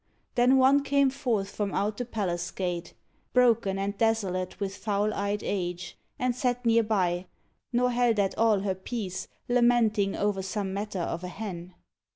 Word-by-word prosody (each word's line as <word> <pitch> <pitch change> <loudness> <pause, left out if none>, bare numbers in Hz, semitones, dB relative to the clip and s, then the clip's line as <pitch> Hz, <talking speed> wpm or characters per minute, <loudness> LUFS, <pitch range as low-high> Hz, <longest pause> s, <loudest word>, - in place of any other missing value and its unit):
Then 250 +2 +4
one 270 +2 +5
came 280 -1 +3
forth 235 -8 -1
from 205 -2 -2
out 205 +1 0
the 245 - -3
palace 180 -7 -2
gate 175 -2 -4 0.2
— - - -41
Broken 230 -6 +3
and 200 +1 -2
desolate 195 -5 0
with 195 -1 -3
foul 205 +1 0
eyed 200 +1 -2
age. 180 -2 -3 0.2
And 250 -1 0
sat 245 -1 -1
near 230 0 +5
by, 185 -5 0 0.4
nor 250 0 +2
held 240 -2 +2
at 195 -2 +1
all 220 -3 +3
her 195 -1 0
peace, 190 0 -5 0.2
Lamenting 235 -5 +3
o'er 205 -1 0
some 190 0 -3
matter 205 0 -4
of 170 +1 -3
a - - -3
hen. 180 -2 -7
205 Hz, 170 wpm, -28 LUFS, 190-240 Hz, 0.4 s, one